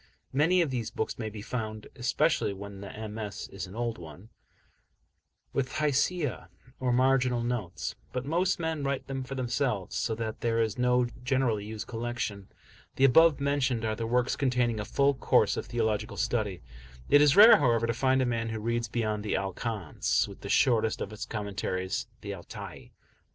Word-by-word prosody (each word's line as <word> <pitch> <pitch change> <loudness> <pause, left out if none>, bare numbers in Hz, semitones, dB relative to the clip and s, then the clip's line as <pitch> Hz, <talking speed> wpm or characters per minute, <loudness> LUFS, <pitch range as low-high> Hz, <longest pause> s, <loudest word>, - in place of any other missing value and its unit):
Many 170 +6 +4
of 150 - -3
these 120 -4 -2
books 110 - -3
may 110 -2 -3
be 105 -1 -8
found 110 -3 -4
especially 130 -1 +1
when 100 0 -9
the 110 +2 -7
MS. 105 -2 -6
is 95 -1 -6
an 95 - -11
old 115 -2 -2
one 85 +6 -11 1.2
with 130 -1 -1
Hashiyah, 145 - 0 0.3
or 130 -1 0
marginal 125 -1 +3
notes, 120 -8 -3 0.2
but 125 0 -3
most 175 +6 +1
men 160 -3 -2
write 140 -1 -1
them 135 -1 -4
for 135 +1 -6
themselves, 125 -5 -1
so 110 - -1
that 110 -1 -5
there 115 -1 +1
is 110 -2 +1
no 125 0 +3 0.2
generally 125 -5 +1
used 110 0 -6
collection. 115 -4 -4 0.5
The 135 - +4
above 155 +2 +6
mentioned 135 -5 0
are 110 -1 0
the 115 +1 -3
works 125 +2 +1
containing 125 -4 +1
a 105 - -3
full 140 +5 +2
course 130 - +3
of - - -4
theological 110 -3 -1
study; 105 -6 -1 0.4
it 145 +1 +6
is 145 -1 +5
rare, 220 +3 +10
however, 115 -5 +2
to 115 - 0
find 130 +2 +2
a - - +1
man 115 -2 -1
who 110 0 -3
reads 115 +1 -1
beyond 110 -2 -2
the 105 - -1
"Al 95 0 -2
Kanz," 105 -7 -1
with - - -11
the - - -7
shortest 110 -3 +3
of 105 - -5
its 110 - -6
commentaries, 95 -3 -3
the 100 -1 -5
"Al 90 -3 -9
Tai." - - -9
120 Hz, 180 wpm, -29 LUFS, 105-130 Hz, 1.2 s, rare